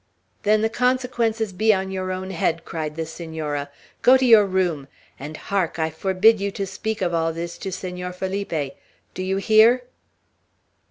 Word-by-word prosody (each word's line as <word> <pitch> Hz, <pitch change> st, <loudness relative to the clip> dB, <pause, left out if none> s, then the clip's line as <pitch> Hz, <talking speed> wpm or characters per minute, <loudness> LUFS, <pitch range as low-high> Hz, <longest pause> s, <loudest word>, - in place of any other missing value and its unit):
"Then 215 Hz, +1 st, +3 dB
the -, -, +4 dB
consequences 235 Hz, -4 st, 0 dB
be 215 Hz, +4 st, +3 dB
on 190 Hz, 0 st, -3 dB
your 185 Hz, -1 st, -3 dB
own 185 Hz, +1 st, -4 dB
head," 165 Hz, -2 st, -1 dB
cried 155 Hz, -2 st, -4 dB
the 165 Hz, 0 st, -3 dB
Senora. 155 Hz, -3 st, -5 dB, 0.3 s
"Go 255 Hz, +1 st, +7 dB
to 260 Hz, -, +1 dB
your 220 Hz, -4 st, +7 dB
room! 175 Hz, -7 st, -1 dB, 0.3 s
And, 150 Hz, +3 st, -7 dB
hark! 190 Hz, -5 st, -2 dB
I 160 Hz, -1 st, -1 dB
forbid 195 Hz, +5 st, +3 dB
you 200 Hz, -, 0 dB
to 195 Hz, -, -3 dB
speak 200 Hz, +2 st, -4 dB
of 175 Hz, -1 st, 0 dB
all 165 Hz, 0 st, +1 dB
this 170 Hz, +1 st, -5 dB
to 190 Hz, -, -5 dB
Senor 180 Hz, 0 st, -5 dB
Felipe. 180 Hz, -6 st, -3 dB, 0.4 s
Do -, -, -5 dB
you 190 Hz, +1 st, -1 dB
hear?" 220 Hz, +5 st, +5 dB
190 Hz, 170 wpm, -23 LUFS, 165-215 Hz, 0.4 s, Go